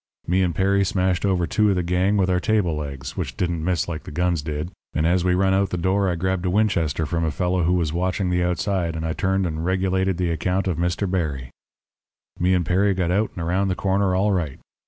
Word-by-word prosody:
"Me 90 Hz, +2 st, +2 dB
and 90 Hz, -3 st, 0 dB
Perry 100 Hz, +2 st, +2 dB
smashed 95 Hz, 0 st, 0 dB
over 90 Hz, -3 st, +1 dB
two 105 Hz, +4 st, +2 dB
of 100 Hz, -, +2 dB
the 90 Hz, -, 0 dB
gang 90 Hz, +4 st, +1 dB
with 95 Hz, -2 st, +2 dB
our 90 Hz, -1 st, +2 dB
table 95 Hz, -5 st, +1 dB
legs, 70 Hz, -3 st, -6 dB
which -, -, -4 dB
didn't 85 Hz, -3 st, -1 dB
miss 90 Hz, -2 st, 0 dB
like 80 Hz, -3 st, -4 dB
the -, -, -10 dB
guns 85 Hz, +1 st, 0 dB
did, 75 Hz, +3 st, -4 dB, 0.2 s
and 80 Hz, -, +1 dB
as 85 Hz, +1 st, +2 dB
we 90 Hz, 0 st, +2 dB
run 95 Hz, +1 st, +2 dB
out 95 Hz, 0 st, +2 dB
the 90 Hz, -, -2 dB
door 95 Hz, +3 st, +1 dB
I 90 Hz, -, 0 dB
grabbed 95 Hz, +1 st, -1 dB
a -, -, +2 dB
Winchester 90 Hz, -6 st, +1 dB
from 85 Hz, +2 st, -1 dB
a 80 Hz, -, +1 dB
fellow 90 Hz, +4 st, 0 dB
who 90 Hz, -, +2 dB
was 85 Hz, -4 st, 0 dB
watching 90 Hz, +1 st, -1 dB
the 90 Hz, 0 st, +1 dB
outside, 90 Hz, -1 st, -1 dB
and 80 Hz, 0 st, -3 dB
I 80 Hz, -, -1 dB
turned 95 Hz, +1 st, 0 dB
and 80 Hz, -1 st, -3 dB
regulated 95 Hz, 0 st, 0 dB
the 90 Hz, -2 st, 0 dB
account 90 Hz, +4 st, -1 dB
of 90 Hz, -4 st, -1 dB
Mr. 90 Hz, +3 st, 0 dB
Berry. 75 Hz, -9 st, -2 dB, 0.9 s
"Me 90 Hz, +1 st, +3 dB
and 90 Hz, -2 st, 0 dB
Perry 95 Hz, +3 st, +2 dB
got 90 Hz, -2 st, 0 dB
out 105 Hz, +4 st, +1 dB
and 85 Hz, -, -4 dB
around 95 Hz, +4 st, +1 dB
the 95 Hz, -, 0 dB
corner 95 Hz, -1 st, +1 dB
all 100 Hz, +3 st, +2 dB
right. 85 Hz, -8 st, -2 dB
90 Hz, 240 wpm, -23 LUFS, 85-95 Hz, 0.9 s, Me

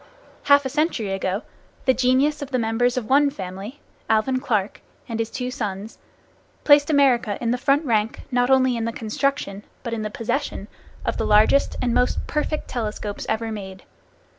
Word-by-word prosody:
Half 285 Hz, -1 st, +5 dB
a -, -, -1 dB
century 285 Hz, -, -1 dB
ago 195 Hz, +2 st, -2 dB, 0.4 s
the 260 Hz, -, +5 dB
genius 260 Hz, +4 st, +2 dB
of 285 Hz, -, -5 dB
the 260 Hz, -, 0 dB
members 240 Hz, +2 st, +1 dB
of 235 Hz, -4 st, -2 dB
one 285 Hz, +2 st, +4 dB
family, 195 Hz, +4 st, -8 dB, 0.3 s
Alvan 225 Hz, +4 st, +2 dB
Clark 215 Hz, -7 st, -1 dB, 0.3 s
and 230 Hz, -1 st, -4 dB
his 225 Hz, 0 st, -1 dB
two 250 Hz, +1 st, -4 dB
sons, 210 Hz, -2 st, -5 dB, 0.6 s
placed 290 Hz, 0 st, +6 dB
America 255 Hz, -8 st, +3 dB
in 235 Hz, -1 st, -1 dB
the -, -, +2 dB
front 280 Hz, +3 st, +2 dB
rank 220 Hz, -3 st, 0 dB
not 245 Hz, 0 st, +2 dB
only 260 Hz, -2 st, +4 dB
in 230 Hz, -1 st, -2 dB
the 230 Hz, -, -2 dB
construction, 220 Hz, -3 st, -2 dB, 0.2 s
but 235 Hz, -2 st, -4 dB
in 225 Hz, -, -2 dB
the 215 Hz, -, -3 dB
possession, 230 Hz, -1 st, -3 dB, 0.4 s
of -, -, -1 dB
the -, -, -1 dB
largest 215 Hz, +6 st, +4 dB
and 240 Hz, -2 st, +1 dB
most 250 Hz, -, +1 dB
perfect 300 Hz, 0 st, -2 dB
telescopes 215 Hz, -3 st, -4 dB
ever 225 Hz, 0 st, -1 dB
made. 190 Hz, -3 st, -7 dB
240 Hz, 175 wpm, -23 LUFS, 215-270 Hz, 0.6 s, placed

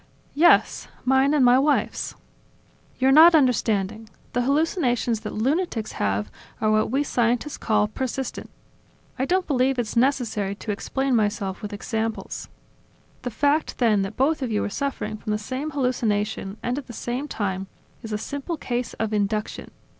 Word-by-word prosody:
"Yes; 340 Hz, +4 st, +4 dB, 0.2 s
mine 265 Hz, +2 st, +4 dB
and 275 Hz, -4 st, +4 dB
my 245 Hz, +1 st, +6 dB
wife's!" 290 Hz, +2 st, 0 dB, 0.8 s
"You're 265 Hz, +1 st, +3 dB
not 325 Hz, +4 st, +8 dB
understanding. 220 Hz, -6 st, +1 dB, 0.2 s
The 245 Hz, -, +1 dB
hallucinations 255 Hz, -, +1 dB
that 215 Hz, -, -6 dB
lunatics 255 Hz, -1 st, -1 dB
have 100 Hz, +1 st, -1 dB, 0.3 s
are 215 Hz, -1 st, +2 dB
what 215 Hz, 0 st, +2 dB
we 270 Hz, +5 st, +1 dB
scientists 245 Hz, +2 st, 0 dB
call 210 Hz, -2 st, +2 dB
persistent. 260 Hz, +3 st, -4 dB, 0.7 s
I 260 Hz, -, +1 dB
don't 370 Hz, +4 st, +1 dB
believe 265 Hz, -2 st, +1 dB
it's 235 Hz, -3 st, -2 dB
necessary 235 Hz, -6 st, +1 dB
to 210 Hz, +1 st, -5 dB
explain 265 Hz, +5 st, -1 dB
myself 205 Hz, -3 st, -1 dB
with 210 Hz, -, -5 dB
examples... 220 Hz, +2 st, -4 dB, 0.7 s
The 245 Hz, -, -3 dB
fact 285 Hz, +6 st, +1 dB
then 220 Hz, -5 st, +3 dB
that 195 Hz, +2 st, -4 dB
both 285 Hz, +3 st, +2 dB
of 250 Hz, -3 st, -2 dB
you 210 Hz, -, 0 dB
are -, -, -2 dB
suffering 220 Hz, -5 st, -3 dB
from 215 Hz, 0 st, -3 dB
the -, -, +1 dB
same 260 Hz, +8 st, -4 dB
hallucination, 220 Hz, -7 st, -1 dB
and 245 Hz, +3 st, -1 dB
at 280 Hz, -, -11 dB
the 240 Hz, -, -9 dB
same 245 Hz, +5 st, -3 dB
time, 195 Hz, -6 st, -3 dB, 0.3 s
is 225 Hz, -2 st, -8 dB
a 210 Hz, -, 0 dB
simple 285 Hz, +9 st, -4 dB
case 245 Hz, -4 st, -3 dB
of 220 Hz, -1 st, -2 dB
induction. 210 Hz, +1 st, -2 dB
240 Hz, 160 wpm, -24 LUFS, 215-270 Hz, 0.8 s, not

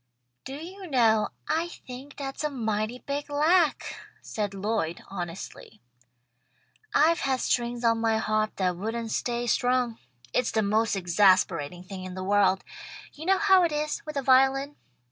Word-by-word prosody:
"Do 265 Hz, -, -6 dB
you 365 Hz, +5 st, -9 dB
know, 225 Hz, -7 st, +3 dB, 0.2 s
I 325 Hz, +2 st, 0 dB
think 265 Hz, -3 st, -10 dB
that's 270 Hz, +1 st, -5 dB
a 300 Hz, -, +1 dB
mighty 220 Hz, -3 st, -2 dB
big 285 Hz, +1 st, -3 dB
lack," 310 Hz, +3 st, +2 dB, 0.2 s
said 205 Hz, -2 st, -4 dB
Lloyd, 195 Hz, -4 st, -2 dB
honestly. 175 Hz, -2 st, -7 dB, 1.1 s
"I've 330 Hz, +3 st, +4 dB
had 265 Hz, -1 st, 0 dB
strings 240 Hz, -1 st, -1 dB
on 230 Hz, -1 st, +2 dB
my 225 Hz, -1 st, +2 dB
harp 215 Hz, 0 st, 0 dB
that 180 Hz, -2 st, 0 dB
wouldn't 225 Hz, +3 st, -3 dB
stay 240 Hz, +1 st, -1 dB
strung. 245 Hz, -1 st, +1 dB, 0.3 s
It's 250 Hz, -, +1 dB
the 220 Hz, -, +1 dB
most 215 Hz, +2 st, +1 dB
exasperating 180 Hz, -3 st, +2 dB
thing 185 Hz, 0 st, -8 dB
in 185 Hz, 0 st, -7 dB
the 185 Hz, -, -5 dB
world. 195 Hz, -1 st, +3 dB, 0.5 s
You 315 Hz, +3 st, -9 dB
know 385 Hz, 0 st, +4 dB
how 385 Hz, -2 st, +5 dB
it 340 Hz, -, +1 dB
is, 300 Hz, 0 st, -2 dB
with 305 Hz, -2 st, -6 dB
a 275 Hz, -, -1 dB
violin. 270 Hz, +2 st, +3 dB
235 Hz, 155 wpm, -27 LUFS, 205-285 Hz, 1.1 s, how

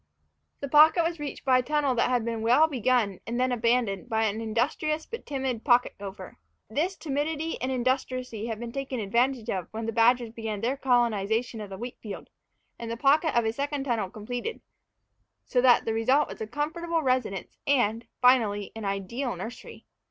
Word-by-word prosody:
The 280 Hz, -, -3 dB
pocket 310 Hz, +4 st, +6 dB
was 330 Hz, 0 st, -2 dB
reached 295 Hz, -1 st, -6 dB
by 255 Hz, -1 st, +5 dB
a -, -, +2 dB
tunnel 285 Hz, +1 st, +1 dB
that 240 Hz, 0 st, +1 dB
had 245 Hz, -3 st, +1 dB
been 230 Hz, -1 st, -2 dB
well 245 Hz, +8 st, +5 dB
begun 245 Hz, -, +1 dB
and 235 Hz, +2 st, -2 dB
then 255 Hz, 0 st, +2 dB
abandoned 235 Hz, -3 st, 0 dB
by 220 Hz, -1 st, +1 dB
an 220 Hz, 0 st, -1 dB
industrious 285 Hz, +8 st, -1 dB
but 465 Hz, -, -8 dB
timid 265 Hz, -5 st, -2 dB
pocket 245 Hz, -2 st, +3 dB
gopher. 195 Hz, -1 st, -9 dB, 0.3 s
This 335 Hz, -, 0 dB
timidity 310 Hz, +1 st, -2 dB
and 255 Hz, +1 st, -1 dB
industry 255 Hz, 0 st, 0 dB, 0.2 s
had 225 Hz, -2 st, -4 dB
been 235 Hz, 0 st, -6 dB
taken 270 Hz, -1 st, -4 dB
advantage 235 Hz, +3 st, 0 dB
of 185 Hz, -3 st, -3 dB
when 225 Hz, +1 st, -5 dB
the 225 Hz, -, -1 dB
badgers 235 Hz, +1 st, +3 dB
began 220 Hz, -3 st, -5 dB
their 250 Hz, +4 st, 0 dB
colonization 235 Hz, -3 st, +1 dB
of 205 Hz, -, -7 dB
the 190 Hz, -, -7 dB
wheat 240 Hz, +3 st, -7 dB
field, 205 Hz, -3 st, -8 dB, 0.5 s
and 230 Hz, -, -5 dB
the 230 Hz, -, -3 dB
pocket 295 Hz, +4 st, +3 dB
and 235 Hz, -, +3 dB
a 220 Hz, -, 0 dB
second 280 Hz, +2 st, -2 dB
tunnel 230 Hz, -8 st, -1 dB
completed; 245 Hz, -, -5 dB, 0.8 s
so 250 Hz, -, +1 dB
that 250 Hz, -1 st, +5 dB
the 225 Hz, -, 0 dB
result 255 Hz, +7 st, +3 dB
was -, -, -9 dB
a 220 Hz, -, -3 dB
comfortable 320 Hz, +6 st, -2 dB
residence 255 Hz, -7 st, -1 dB
and, 230 Hz, -4 st, +1 dB, 0.2 s
finally, 215 Hz, -6 st, +3 dB
an 220 Hz, -2 st, -6 dB
ideal 200 Hz, +7 st, -2 dB
nursery. 235 Hz, +2 st, -9 dB
245 Hz, 185 wpm, -27 LUFS, 225-275 Hz, 0.8 s, pocket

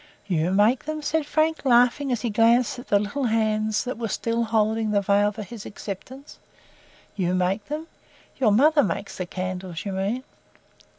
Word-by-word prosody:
"YOU 175 Hz, -4 st, 0 dB
make 210 Hz, +8 st, +3 dB
them?" 310 Hz, 0 st, -4 dB
said 310 Hz, 0 st, 0 dB
Frank, 310 Hz, 0 st, +1 dB
laughing 250 Hz, +2 st, +3 dB
as 240 Hz, -3 st, -1 dB
he 235 Hz, -, -2 dB
glanced 230 Hz, +3 st, +3 dB
at 245 Hz, -, -11 dB
the 205 Hz, -, +4 dB
little 210 Hz, +7 st, -2 dB
hands 215 Hz, -1 st, +1 dB
that 255 Hz, -2 st, -5 dB
were 230 Hz, -, -2 dB
still 230 Hz, +3 st, -1 dB
holding 220 Hz, 0 st, +1 dB
the 205 Hz, -1 st, +2 dB
veil 205 Hz, +1 st, +2 dB
for 215 Hz, +1 st, -7 dB
his 205 Hz, +2 st, -9 dB
acceptance. 255 Hz, +9 st, -9 dB, 0.8 s
"YOU 185 Hz, -2 st, 0 dB
make 185 Hz, +3 st, 0 dB
them? 305 Hz, +2 st, -5 dB, 0.5 s
Your 240 Hz, -6 st, +3 dB
mother 290 Hz, +8 st, +5 dB
makes 200 Hz, -1 st, -3 dB
the 185 Hz, -, -3 dB
candles, 185 Hz, -1 st, -5 dB
you 200 Hz, -, -3 dB
mean." 200 Hz, +7 st, -2 dB
220 Hz, 175 wpm, -24 LUFS, 200-255 Hz, 0.8 s, mother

